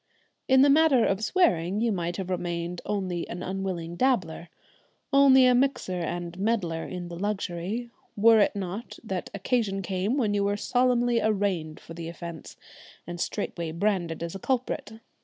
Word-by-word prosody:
In 265 Hz, 0 st, +6 dB
the 285 Hz, -, +5 dB
matter 290 Hz, -5 st, +5 dB
of 195 Hz, +2 st, 0 dB
swearing 205 Hz, -, +2 dB
you 230 Hz, 0 st, +1 dB
might 175 Hz, -3 st, -2 dB
have 190 Hz, -1 st, -4 dB
remained 175 Hz, -1 st, -3 dB
only 185 Hz, -4 st, -2 dB
an 175 Hz, +1 st, -5 dB
unwilling 185 Hz, -3 st, -4 dB
dabbler, 175 Hz, -8 st, 0 dB, 0.6 s
only 270 Hz, -2 st, +7 dB
a 250 Hz, -, +5 dB
mixer 245 Hz, -8 st, 0 dB
and 175 Hz, +1 st, -4 dB
meddler 190 Hz, -7 st, -1 dB
in 180 Hz, -1 st, -6 dB
the 175 Hz, -, -7 dB
luxury, 205 Hz, +3 st, -3 dB, 0.2 s
were 225 Hz, +1 st, +6 dB
it 205 Hz, -, +3 dB
not 195 Hz, +3 st, -5 dB
that 190 Hz, -5 st, -4 dB
occasion 200 Hz, -2 st, -1 dB
came 190 Hz, +7 st, -1 dB
when 220 Hz, -6 st, +1 dB
you 200 Hz, -1 st, +1 dB
were 200 Hz, 0 st, 0 dB
solemnly 245 Hz, 0 st, +2 dB
arraigned 190 Hz, -7 st, -1 dB
for 165 Hz, -, -11 dB
the 165 Hz, 0 st, -6 dB
offence, 170 Hz, -1 st, -9 dB, 0.5 s
and 175 Hz, 0 st, -6 dB
straightway 170 Hz, -5 st, -3 dB
branded 170 Hz, -2 st, -1 dB
as 170 Hz, -, -4 dB
a 195 Hz, -, -6 dB
culprit. 250 Hz, -2 st, -2 dB
195 Hz, 160 wpm, -27 LUFS, 175-230 Hz, 0.6 s, only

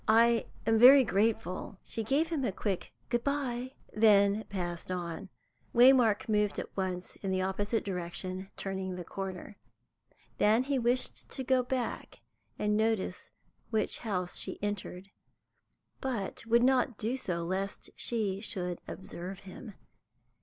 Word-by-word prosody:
"I 230 Hz, +1 st, +4 dB, 0.2 s
am 225 Hz, -1 st, +3 dB
very 265 Hz, +3 st, +10 dB
grateful." 210 Hz, -3 st, 0 dB
She 225 Hz, -, -3 dB
gave 285 Hz, +8 st, +1 dB
him 315 Hz, -5 st, -1 dB
a 235 Hz, -, +1 dB
quick 195 Hz, -1 st, -3 dB
"good 240 Hz, -1 st, 0 dB
bye," 260 Hz, -2 st, -2 dB, 0.2 s
and 215 Hz, -, -6 dB
then 205 Hz, -1 st, +5 dB
passed 175 Hz, -2 st, -4 dB
on. 180 Hz, +1 st, -4 dB, 0.5 s
Waymark 240 Hz, -3 st, +6 dB
moved 210 Hz, -2 st, +1 dB
at -, -, -6 dB
once 185 Hz, -2 st, -3 dB
in 195 Hz, -, -4 dB
the 185 Hz, 0 st, +1 dB
opposite 205 Hz, +4 st, -1 dB
direction, 185 Hz, 0 st, -4 dB
turning 190 Hz, -1 st, -4 dB
the 180 Hz, -, -5 dB
corner. 190 Hz, +2 st, -6 dB, 0.8 s
Then 220 Hz, +4 st, +4 dB
he 275 Hz, 0 st, 0 dB
wished 245 Hz, +2 st, 0 dB
to 265 Hz, -, -3 dB
go 260 Hz, 0 st, +3 dB
back 250 Hz, 0 st, -4 dB, 0.3 s
and 210 Hz, 0 st, +1 dB
notice 220 Hz, -3 st, 0 dB, 0.4 s
which 220 Hz, -2 st, 0 dB
house 185 Hz, -6 st, -2 dB
she -, -, -3 dB
entered, 200 Hz, -2 st, -4 dB, 0.9 s
but 230 Hz, -5 st, -3 dB
would 235 Hz, +1 st, +4 dB
not 255 Hz, -3 st, +3 dB
do 230 Hz, +4 st, -1 dB
so 175 Hz, -10 st, -3 dB
lest 190 Hz, +3 st, -3 dB
she 205 Hz, -5 st, 0 dB
should 180 Hz, -5 st, -3 dB
observe 185 Hz, 0 st, -7 dB
him. 200 Hz, +2 st, -10 dB
210 Hz, 140 wpm, -31 LUFS, 190-240 Hz, 0.9 s, very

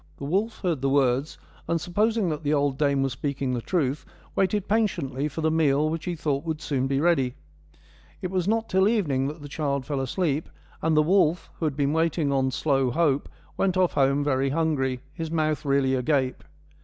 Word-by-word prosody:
The -, -, -6 dB
wolf 205 Hz, +9 st, -1 dB
heard 170 Hz, -8 st, -1 dB
the 135 Hz, -, +1 dB
words, 135 Hz, +1 st, +1 dB, 0.3 s
and 165 Hz, 0 st, +1 dB
supposing 210 Hz, +4 st, +1 dB
that 150 Hz, -1 st, -3 dB
the 150 Hz, 0 st, +1 dB
old 140 Hz, -1 st, +1 dB
dame 140 Hz, -2 st, +2 dB
was 135 Hz, -, -1 dB
speaking 135 Hz, -1 st, -2 dB
the 120 Hz, -, -2 dB
truth, 145 Hz, -2 st, -1 dB, 0.3 s
waited 195 Hz, +1 st, +1 dB
patiently 165 Hz, -, 0 dB
for 155 Hz, +2 st, -5 dB
the 160 Hz, 0 st, +2 dB
meal 155 Hz, -1 st, +2 dB
which 165 Hz, -1 st, -4 dB
he 175 Hz, -1 st, -2 dB
thought 145 Hz, -3 st, -1 dB
would 160 Hz, -2 st, -3 dB
soon 135 Hz, -4 st, -1 dB
be 135 Hz, 0 st, 0 dB
ready. 140 Hz, -6 st, +2 dB, 0.8 s
It 185 Hz, -, -4 dB
was 185 Hz, -1 st, 0 dB
not 225 Hz, +1 st, +1 dB
till 190 Hz, +1 st, +3 dB
evening 150 Hz, -, +1 dB
that 150 Hz, +1 st, -7 dB
the -, -, -7 dB
child 140 Hz, -2 st, -2 dB
fell 145 Hz, -2 st, -2 dB
asleep, 150 Hz, +2 st, -1 dB, 0.3 s
and 160 Hz, -1 st, +2 dB
the 155 Hz, -, +6 dB
wolf, 175 Hz, 0 st, +2 dB
who 165 Hz, -, -1 dB
had 150 Hz, -3 st, -1 dB
been 145 Hz, 0 st, +1 dB
waiting 160 Hz, -2 st, +1 dB
on 135 Hz, -1 st, +2 dB
slow 135 Hz, -1 st, +1 dB
hope, 145 Hz, 0 st, +1 dB, 0.3 s
went 190 Hz, -1 st, +1 dB
off 185 Hz, -1 st, +2 dB
home 140 Hz, 0 st, +2 dB
very 135 Hz, -1 st, +1 dB
hungry, 135 Hz, -4 st, 0 dB
his 165 Hz, -2 st, -5 dB
mouth 155 Hz, -2 st, 0 dB
really 140 Hz, -1 st, +2 dB
agape. 130 Hz, 0 st, 0 dB
150 Hz, 200 wpm, -25 LUFS, 135-170 Hz, 0.8 s, the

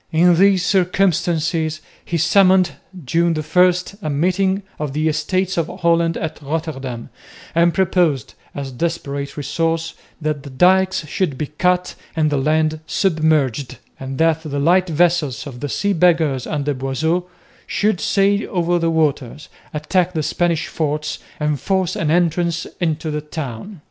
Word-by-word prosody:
In 175 Hz, +2 st, +5 dB
these 190 Hz, 0 st, +4 dB
circumstances 175 Hz, -4 st, +1 dB, 0.2 s
he 170 Hz, -, -2 dB
summoned, 185 Hz, +2 st, +4 dB, 0.3 s
June 170 Hz, +5 st, +1 dB
1, 175 Hz, +4 st, +3 dB, 0.3 s
a 155 Hz, -, -3 dB
meeting 185 Hz, +6 st, +1 dB, 0.2 s
of 150 Hz, -3 st, -3 dB
the 155 Hz, +2 st, 0 dB
Estates 185 Hz, +5 st, 0 dB
of 165 Hz, -2 st, +1 dB
Holland 170 Hz, -2 st, +1 dB
at 160 Hz, -1 st, -5 dB
Rotterdam 140 Hz, -5 st, -4 dB, 0.4 s
and 170 Hz, +1 st, +4 dB
proposed, 170 Hz, -, +1 dB, 0.2 s
as 140 Hz, -1 st, -4 dB
a -, -, -11 dB
desperate 140 Hz, -2 st, -3 dB
resource, 165 Hz, +2 st, -1 dB, 0.3 s
that 155 Hz, -2 st, -2 dB
the 140 Hz, -, -10 dB
dykes 185 Hz, +5 st, +3 dB
should 150 Hz, -3 st, -1 dB
be 150 Hz, -, -2 dB
cut 180 Hz, +5 st, 0 dB, 0.2 s
and 155 Hz, -2 st, +1 dB
the 145 Hz, -, +1 dB
land 155 Hz, +2 st, +1 dB
submerged, 155 Hz, -, +1 dB, 0.2 s
and 135 Hz, 0 st, -6 dB
that 160 Hz, 0 st, +2 dB
the 150 Hz, -3 st, -5 dB
light 175 Hz, +5 st, +3 dB
vessels 160 Hz, -6 st, +1 dB
of 130 Hz, -4 st, -8 dB
the 145 Hz, +2 st, -4 dB
Sea 200 Hz, +8 st, 0 dB
Beggars 160 Hz, -7 st, +2 dB
under 145 Hz, -1 st, -1 dB
Boisot 140 Hz, +7 st, -1 dB, 0.4 s
should 210 Hz, -3 st, 0 dB
sail 200 Hz, +1 st, +2 dB
over 175 Hz, -1 st, +1 dB
the 165 Hz, 0 st, +1 dB
waters, 150 Hz, -3 st, -1 dB, 0.2 s
attack 175 Hz, +4 st, 0 dB
the 155 Hz, -2 st, -1 dB
Spanish 170 Hz, +1 st, 0 dB
forts 150 Hz, -1 st, -2 dB, 0.2 s
and 150 Hz, -2 st, 0 dB
force 190 Hz, -2 st, 0 dB
an 155 Hz, -, -1 dB
entrance 170 Hz, 0 st, +1 dB
into 160 Hz, -2 st, -1 dB
the 150 Hz, 0 st, -2 dB
town. 150 Hz, -, -7 dB
160 Hz, 150 wpm, -19 LUFS, 150-180 Hz, 0.4 s, In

